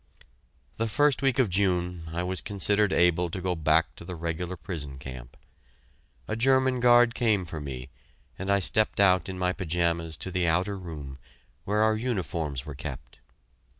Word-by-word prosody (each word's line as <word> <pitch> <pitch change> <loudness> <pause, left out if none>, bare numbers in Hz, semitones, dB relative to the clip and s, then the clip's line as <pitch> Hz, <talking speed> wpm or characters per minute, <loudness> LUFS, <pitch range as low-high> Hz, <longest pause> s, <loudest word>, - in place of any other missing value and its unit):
The 115 - 0
first 145 +5 +2
week 135 -2 +2
of 130 -4 +4
June, 90 -3 0
I 85 +2 -2
was 95 +1 -2
considered 100 0 +1
able 90 0 +3
to 95 - -4
go 90 0 -1
back 80 -1 +2
to - - -9
the 90 +1 -7
regular 85 +2 -4
prison 75 -7 -6
camp. 65 -2 -10 0.9
A 110 - -2
German 130 +1 +3
guard 120 -1 +5
came 110 -7 +1
for 80 -1 -6
me, 65 -2 -6 0.5
and 95 +1 -4
I 100 - +5
stepped 105 +3 +2
out 90 -3 +4
in 95 - -5
my 90 0 0
pajamas 85 -3 -1
to 95 - -4
the 90 -1 0
outer 90 +5 +1
room 75 -7 -8 0.5
where 105 +2 +2
our 110 0 +3
uniforms 85 - -3
were 75 - -6
kept. 65 -3 -8
90 Hz, 170 wpm, -27 LUFS, 80-105 Hz, 0.9 s, guard